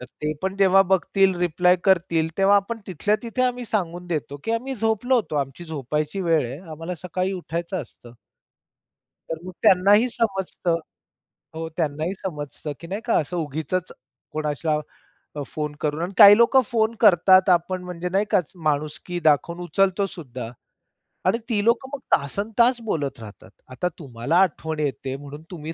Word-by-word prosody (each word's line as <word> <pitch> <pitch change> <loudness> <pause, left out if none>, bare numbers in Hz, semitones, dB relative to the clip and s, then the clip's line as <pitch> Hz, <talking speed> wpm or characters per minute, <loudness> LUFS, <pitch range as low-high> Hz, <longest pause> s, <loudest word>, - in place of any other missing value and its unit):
तर - - -7 0.2
ते 150 0 0
पण 190 +1 -2
जेव्हा 195 -1 +5
बघतील 190 0 +3
रिप्लाय 180 +1 +3
करतील, 170 -4 +2
तेव्हा 195 +1 +5
आपण 215 +4 -1
तिथल्या-तिथे 215 - -1
आम्ही 250 -1 0
सांगून 180 -5 -3
देतो, 155 -4 -3
की - - -2
आम्ही 255 +4 -2
झोपलो 225 +3 +1
होतो. 215 -10 0
आमची 140 +4 -3
झोपायची 150 +3 -3
वेळ 165 -4 +2
आहे. 125 +4 -6
आम्हाला 165 +3 -5
सकाळी 185 +1 -2
उठायचं 175 0 -4
असतं. 120 -2 -16 1.2
तर 165 - -3
मग 185 - -6
त्यांनाही 205 +4 +5
समजतं 195 -7 -1 0.8
हो. 160 0 -4
त्यांनाही 155 +1 -1
समजतं, 150 -5 -6
की 170 - -9
नाही 195 +5 -4
का 235 - +1
असं 160 +4 -3
उगीचच 160 +3 -3 0.4
कोणासला 150 0 -1 0.7
फोन 150 -1 -4
करून 150 +1 -1
आणि 180 +3 -3
काही 205 -1 +10
लोकं 235 +3 +5
फोन 220 0 +1
करतात 185 -2 +6
आपण 180 +1 +1
म्हणजे 180 0 -5
नाही 195 +3 +2
का - - +5 0.2
माणुसकी 155 +4 -2
दाखवून 160 +3 +2
उचलतो 195 +3 +1
सुद्धा 130 -10 -8 0.8
आणि 185 +5 +3
ती 210 -3 +1
लोकं 235 +3 +2
मग 285 - -3 0.2
तासन 180 +9 -4
तास 240 +1 +4
बोलत 150 - -3
राहतात. 110 -2 -12 0.2
आता 130 +8 -2
तुम्हाला 135 +2 -2
आठवण 160 -4 -1
येते 135 -2 -2
म्हणून 145 +2 -9
तुम्ही 160 -2 -6
180 Hz, 155 wpm, -23 LUFS, 155-200 Hz, 1.2 s, काही